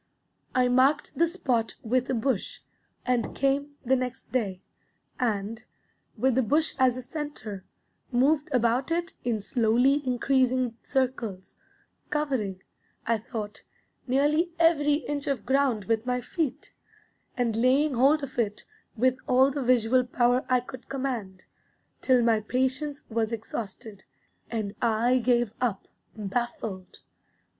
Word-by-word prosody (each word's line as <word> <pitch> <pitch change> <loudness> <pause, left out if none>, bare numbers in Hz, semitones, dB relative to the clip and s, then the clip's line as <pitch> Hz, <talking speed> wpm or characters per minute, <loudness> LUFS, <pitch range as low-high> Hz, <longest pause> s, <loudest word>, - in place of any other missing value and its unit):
I 255 -1 +4
marked 265 +4 +2
the 335 - +3
spot 260 -11 -1
with 255 +3 0
a 260 - +1
bush, 230 -2 -1 0.4
and 250 -2 0
came 280 +1 0
the 260 +2 +4
next 255 0 -4
day, 200 -7 -1 0.6
and, 220 -1 -1 0.5
with 260 0 +2
the 260 - +3
bush 300 +7 +2
as 255 -1 +4
a 255 - -5
centre, 245 -9 -6 0.5
moved 280 +4 +2
about 250 +1 +2
it 340 0 -1
in 235 -3 0
slowly 245 +6 +2
increasing 255 -1 +1
circles, 240 -8 -2 0.5
covering, 250 -11 -1 0.4
I 230 -1 +1
thought, 215 -2 -6 0.5
nearly 295 +6 +2
every 310 -3 +4
inch 290 -1 -2
of 275 -4 -1
ground 265 -5 +1
with 225 +2 0
my 250 0 +1
feet, 305 +2 -3 0.6
and 235 -3 +1
laying 265 +5 +3
hold 275 +5 +4
of 265 -2 -5
it 210 -3 -1 0.3
with 255 +2 +2
all 260 +2 +5
the 280 +1 -3
visual 250 0 +3
power 245 0 +2
I 255 -1 +3
could 255 0 -11
command, 245 -9 -4 0.6
till 255 -2 +4
my 230 -2 +3
patience 260 +6 -1
was 225 0 0
exhausted, 220 -2 -6 0.5
and 215 -3 -3
I 235 +2 +3
gave 240 -2 +2
up, 230 -6 -1 0.3
baffled. 210 -3 -4
250 Hz, 130 wpm, -27 LUFS, 225-270 Hz, 0.6 s, all